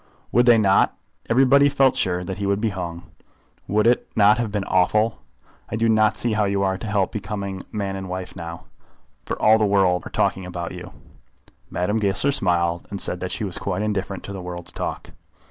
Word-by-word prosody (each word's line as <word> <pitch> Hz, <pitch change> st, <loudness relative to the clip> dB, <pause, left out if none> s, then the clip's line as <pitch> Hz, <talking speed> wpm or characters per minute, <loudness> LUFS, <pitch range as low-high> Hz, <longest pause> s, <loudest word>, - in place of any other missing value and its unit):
"Would 120 Hz, +1 st, +3 dB
they 120 Hz, -1 st, +7 dB
not? 100 Hz, -3 st, +3 dB, 0.3 s
Everybody 135 Hz, +4 st, +5 dB
felt 135 Hz, -2 st, +3 dB
sure 90 Hz, -2 st, 0 dB
that 95 Hz, +1 st, -5 dB
he 100 Hz, 0 st, -2 dB
would 100 Hz, 0 st, +1 dB
be 110 Hz, +1 st, 0 dB
hung. 85 Hz, -3 st, -6 dB, 0.6 s
Would 105 Hz, +2 st, +1 dB
it 120 Hz, +1 st, +3 dB
not 105 Hz, +1 st, +5 dB
have 115 Hz, -3 st, -2 dB
been 105 Hz, -1 st, -1 dB
awful? 105 Hz, +5 st, +1 dB, 0.5 s
I -, -, -3 dB
do 115 Hz, +1 st, +1 dB
not 110 Hz, -1 st, +3 dB
see 120 Hz, +1 st, -1 dB
how 105 Hz, -1 st, +1 dB
you 100 Hz, 0 st, 0 dB
are 95 Hz, -1 st, +1 dB
to 95 Hz, +4 st, -7 dB
help 100 Hz, -3 st, 0 dB
becoming 100 Hz, -3 st, -5 dB
man 100 Hz, -3 st, -3 dB
and 95 Hz, -1 st, -6 dB
wife 90 Hz, 0 st, -6 dB
now, 85 Hz, -1 st, -8 dB, 0.6 s
for -, -, -4 dB
all 110 Hz, +1 st, +5 dB
the -, -, +2 dB
world 95 Hz, -3 st, +3 dB
are -, -, -8 dB
talking 95 Hz, -, 0 dB
about 90 Hz, -1 st, -5 dB
you." -, -, -9 dB, 0.8 s
Madame 105 Hz, +5 st, -1 dB
Goesler 105 Hz, +7 st, +2 dB
smiled, 85 Hz, -7 st, 0 dB
and 100 Hz, -, -5 dB
said 90 Hz, -, +1 dB
that 90 Hz, 0 st, -4 dB
she -, -, -3 dB
was 95 Hz, -4 st, -2 dB
quite 100 Hz, +1 st, -2 dB
indifferent 100 Hz, -2 st, -3 dB
to 100 Hz, -, -7 dB
the 95 Hz, -, -6 dB
world's 90 Hz, -1 st, -6 dB
talk. -, -, -5 dB
100 Hz, 205 wpm, -22 LUFS, 90-110 Hz, 0.8 s, they